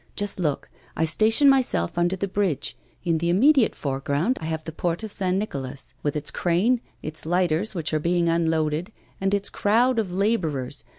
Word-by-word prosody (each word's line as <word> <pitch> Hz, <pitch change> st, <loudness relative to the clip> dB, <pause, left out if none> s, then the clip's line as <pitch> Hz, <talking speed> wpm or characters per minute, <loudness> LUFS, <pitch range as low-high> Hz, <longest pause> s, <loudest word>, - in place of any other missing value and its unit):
Just 205 Hz, -2 st, -2 dB
look! 150 Hz, -5 st, -1 dB, 0.3 s
I 160 Hz, -, +2 dB
station 220 Hz, -, +3 dB
myself 255 Hz, -, +2 dB
under 175 Hz, +2 st, +1 dB
the 195 Hz, +1 st, -2 dB
bridge; 185 Hz, -8 st, -1 dB, 0.3 s
in 165 Hz, -2 st, +1 dB
the 170 Hz, +1 st, 0 dB
immediate 255 Hz, -, +4 dB
foreground 140 Hz, -, -1 dB
I -, -, -4 dB
have 160 Hz, -1 st, -3 dB
the 160 Hz, -, -6 dB
Port 170 Hz, +4 st, -2 dB
of 215 Hz, -, -5 dB
St. 185 Hz, -2 st, 0 dB
Nicolas, 140 Hz, -9 st, -5 dB
with 145 Hz, 0 st, -1 dB
its 150 Hz, -1 st, -2 dB
crane, 200 Hz, +8 st, +1 dB, 0.2 s
its 155 Hz, +1 st, -4 dB
lighters 175 Hz, +4 st, 0 dB
which 160 Hz, -3 st, -2 dB
are 155 Hz, -, +2 dB
being 170 Hz, +2 st, +1 dB
unloaded, 165 Hz, +1 st, 0 dB, 0.3 s
and 195 Hz, 0 st, +1 dB
its 200 Hz, 0 st, 0 dB
crowd 235 Hz, +4 st, +2 dB
of 200 Hz, -5 st, -2 dB
labourers. 170 Hz, -, -1 dB
175 Hz, 180 wpm, -24 LUFS, 155-205 Hz, 0.3 s, immediate